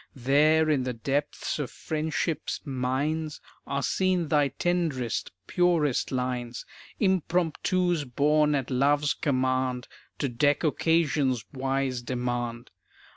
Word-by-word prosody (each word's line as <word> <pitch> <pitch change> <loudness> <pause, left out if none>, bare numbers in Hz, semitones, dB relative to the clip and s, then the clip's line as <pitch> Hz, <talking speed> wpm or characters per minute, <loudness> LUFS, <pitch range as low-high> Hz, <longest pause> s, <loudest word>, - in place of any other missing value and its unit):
There 150 +5 +3
in 150 -4 +2
the 125 0 -2
depths 140 +6 -2
of 145 - -2
friendship's 160 0 -2
mines 145 +4 -2 0.3
Are 140 0 -2
seen 185 -4 +1
thy 145 -2 +3
tenderest, 155 -7 -1
purest 170 -7 +1
lines; 125 -2 -3 0.3
Impromptus 180 -2 +1
born 150 +4 +2
at 135 -1 -2
love's 145 +3 +2
command 130 -2 0 0.3
To 140 - -1
deck 145 +6 +1
occasion's 150 -6 +1
wise 135 -1 -1
demand. 120 -1 -3
140 Hz, 105 wpm, -27 LUFS, 130-155 Hz, 0.3 s, There